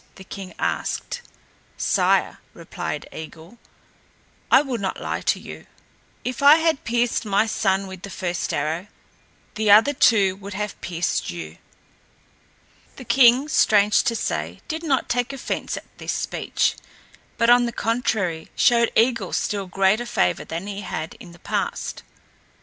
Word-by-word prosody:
the 190 - -12
king 190 0 -8
asked. 485 - -2 0.6
"Sire," - - +1 0.2
replied - - -6
Eigil, 160 +7 -10 0.9
"I - - +6
will 260 -5 -3
not 190 -1 -3
lie - - -3
to - - +1
you. - - -10 0.6
If 250 +1 -4
I 285 +2 +9
had 320 -3 +1
pierced 240 +1 0
my 205 0 +2
son 195 -3 0
with 190 -1 -9
the 200 - -8
first 180 -3 -3
arrow, 160 +6 -2 0.7
the 215 -1 0
other 220 +8 +7
two 200 -8 +4
would 200 0 -8
have 210 0 -4
pierced 175 0 -2
you." 85 -2 -7 1.4
The 255 - -10
king, 255 +3 +5
strange 210 -8 +4
to 230 - +1
say, - - -3
did 320 -1 -4
not 280 -6 0
take 245 +2 -1
offense 270 - -4
at - - -8
this - - -3
speech, - - -1 0.6
but 230 0 +4
on 245 0 +5
the - - -3
contrary 215 -9 -1
showed 235 -1 +4
Eigil 230 -4 +2
still 200 -2 -1
greater 195 +6 +1
favor 90 - +1
than 165 +3 -5
he 205 0 -5
had 160 -4 -5
in 185 -8 -12
the 170 - -15
past. - - -3
210 Hz, 150 wpm, -23 LUFS, 185-240 Hz, 1.4 s, I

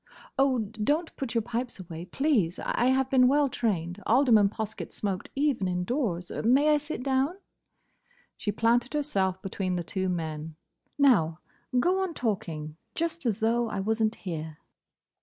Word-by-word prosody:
"Oh—don't 260 - +1
put 255 -3 -4
your 230 - +2
pipes 240 0 -4
away, 170 -2 -7
please. 210 - +1
I 240 - 0
have 265 0 +2
been 255 -2 +6
well 285 +1 +3
trained. 190 -6 -2
Alderman 230 -4 +5
Poskett 215 +1 -5
smoked 195 -3 -3
even 275 -8 +1
indoors. 180 - -1
May 270 +6 +4
I 300 - +5
sit 295 -3 -5
down?" 270 +6 +1 1.0
She 205 - -2
planted 235 +5 +1
herself 195 -11 0
between 185 -1 -2
the 175 - -2
two 190 +2 -2
men. 160 -2 -4 0.4
"Now, 200 - +4 0.4
go 370 +8 +2
on 370 -4 -2
talking, 165 -9 -3 0.2
just 335 -3 -2
as 220 -1 -1
though 230 +1 +2
I 200 - -3
was 220 +3 0
n't 220 +1 +2
here." 160 -4 -6
225 Hz, 150 wpm, -28 LUFS, 185-265 Hz, 1.0 s, been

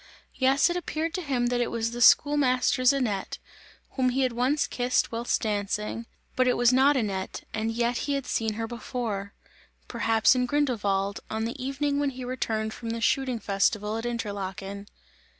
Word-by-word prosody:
Yes, 265 +1 +3
it 350 - -1
appeared 330 -2 -3
to 370 - -2
him 265 -6 -1
that 245 0 0
it 240 - 0
was 230 0 -2
the 240 +1 -5
schoolmaster's 255 -1 +4
Annette, 230 -8 -2 0.5
whom 255 -2 +1
he 260 +2 0
had 255 - +1
once 255 +5 +1
kissed 250 0 0
whilst 235 +1 -1
dancing; 210 +2 -2 0.3
but 255 0 +2
it 250 - +2
was 245 +1 +4
not 270 +2 +5
Annette 195 -5 -3
and 220 +1 -1
yet 235 +1 0
he 285 - -2
had 275 -2 -2
seen 220 -1 -1
her 225 +2 -3
before 225 -3 -4 0.5
perhaps 225 -2 +3
in 250 -1 0
Grindelwald, 205 -8 0
on 220 +1 -2
the 245 +3 -5
evening 280 +2 -1
when 290 -1 +1
he 255 -1 -7
returned 220 -3 -2
from 230 - -7
the 230 0 -2
shooting 255 +1 +1
festival 210 +1 0
at 225 +1 -3
Interlaken. 200 -3 -5
240 Hz, 175 wpm, -27 LUFS, 220-260 Hz, 0.5 s, not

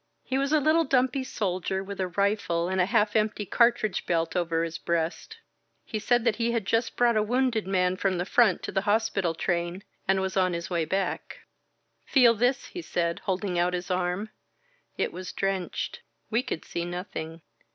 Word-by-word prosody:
He 265 +1 -1
was 275 +1 0
a 310 - +5
little 310 +3 +3
dumpy 260 -1 +1
soldier 190 -5 -2
with 200 0 -7
a 185 - 0
rifle 180 -2 0
and 190 0 +1
a 180 - +2
half 210 +1 +2
empty 215 -1 +1
cartridge 235 -1 +2
belt 165 0 0
over 165 -2 +1
his 165 0 -4
breast. 170 - -2 0.5
He 215 - -3
said 240 +2 +2
that 230 -3 +2
he 235 0 0
had 230 -4 -1
just 225 +3 0
brought 240 -2 +4
a - - +4
wounded 235 -2 +1
man 185 -1 +1
from 190 -2 0
the 175 - -1
front 215 -2 +3
to - - -4
the 195 - +1
hospital 195 -5 +1
train 175 +2 -2 0.2
and 190 0 +3
was 190 0 -2
on 185 -2 +2
his 170 +2 -4
way 170 -2 +1
back. 190 +4 -2 0.7
"Feel 245 -4 +6
this," 245 +4 +1
he 355 - -6
said, 170 - -1
holding 190 -2 -1
out 180 +1 +2
his 180 +1 -4
arm. 180 +4 -1 0.7
It - - -1
was 180 +1 -6
drenched. 195 - -2 0.3
We 230 +3 +3
could 205 - -5
see 170 - -3
nothing. 170 -2 -6
195 Hz, 190 wpm, -27 LUFS, 180-230 Hz, 0.7 s, Feel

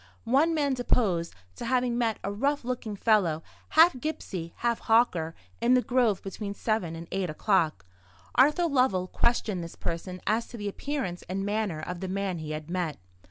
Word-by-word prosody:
One 285 +8 +3
man 285 -3 +1
deposed 205 -9 +1 0.2
to - - -5
having 250 0 +1
met 230 -2 +1
a 200 - -2
rough 280 +8 0
looking 245 -4 -3
fellow, 190 -7 +2 0.3
half 320 -4 +6
gipsy, 185 - -4
half 235 -1 0
hawker, 200 -9 +2 0.3
in 245 +2 +5
the 250 - +4
grove 240 -6 +2
between 200 +1 -5
seven 210 -7 -1
and 165 +1 -8
eight 190 -2 -1
o'clock. 155 - +1 0.5
Arthur 300 +7 +4
Lovell 250 - +2
questioned 205 -2 0
this 165 - -8
person 180 +2 -4
as 220 +3 +1
to 240 - -9
the 205 -1 -4
appearance 205 -5 -3
and 195 +1 -2
manner 205 -6 -1
of 180 +2 -5
the 190 - -4
man 190 -2 -2
he 155 -1 -6
had 155 0 -5
met. 175 -3 -2
205 Hz, 175 wpm, -28 LUFS, 180-245 Hz, 0.5 s, half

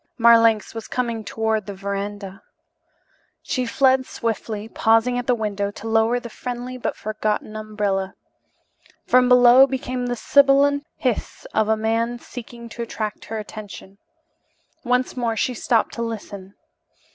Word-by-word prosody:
Marlanx 230 -2 +5
was 225 -1 -7
coming 235 -3 -2
toward 220 -1 -1
the 200 - -6
verandah. 200 0 -5 1.0
She 255 -2 -2
fled 260 +2 +3
swiftly, 220 -2 -4
pausing 225 +2 +2
at 245 - -6
the 250 - +3
window 205 -3 -2
to 205 +2 -9
lower 225 +2 +2
the 240 - -8
friendly 245 +2 -6
but 250 - -3
forgotten 215 0 -3
umbrella. 205 -3 -2 0.9
From 250 0 +4
below 250 +1 +7
came 255 -2 -3
the 245 - -1
sibilant 280 +3 +3
hiss 250 -4 -3
of 220 0 +1
a 220 - +3
man 230 +2 0
seeking 235 -1 -10
to 235 - -7
attract 215 -2 -5
her 225 - -5
attention. 205 -2 -9 0.8
Once 250 0 0
more 235 -3 -1
she 250 - 0
stopped 230 -1 0
to 235 - -5
listen. 205 -4 -6
230 Hz, 140 wpm, -22 LUFS, 215-245 Hz, 1.0 s, below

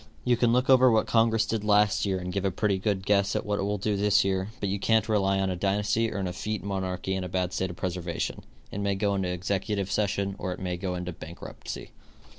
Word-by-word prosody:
You 125 - +4
can 120 0 +2
look 125 +2 +2
over 130 -1 +7
what 110 -2 +3
congress 115 -1 +3
did 110 -1 -2
last 105 -1 +3
year 95 -1 0
and 90 0 -5
give 100 - -1
a 100 - +2
pretty 95 +1 0
good 95 -1 -1
guess 100 -1 +2
at - - -1
what 105 -1 -1
it - - 0
will 100 +1 -1
do 105 +1 -1
this 105 0 +3
year, 95 0 0
but 100 - -1
you 100 +1 -1
can't 110 +1 +2
rely 100 -3 +2
on 95 -1 0
a - - -2
dynasty 105 +4 +1
or 105 - -4
an 95 - -1
effete 105 +4 -4
monarchy 95 -1 -2
in 95 -1 -2
a 90 - -5
bad 90 0 -1
state 95 - -1
of 85 - -7
preservation. 85 -2 -3 0.3
It 100 - -4
may 100 -1 0
go 100 +1 +1
into 95 -2 -1
executive 100 +2 -2
session 100 -2 0
or 90 - -2
it - - -9
may 90 -1 -2
go 90 0 -3
into 90 0 -4
bankruptcy. 85 0 -8
100 Hz, 245 wpm, -27 LUFS, 95-105 Hz, 0.3 s, over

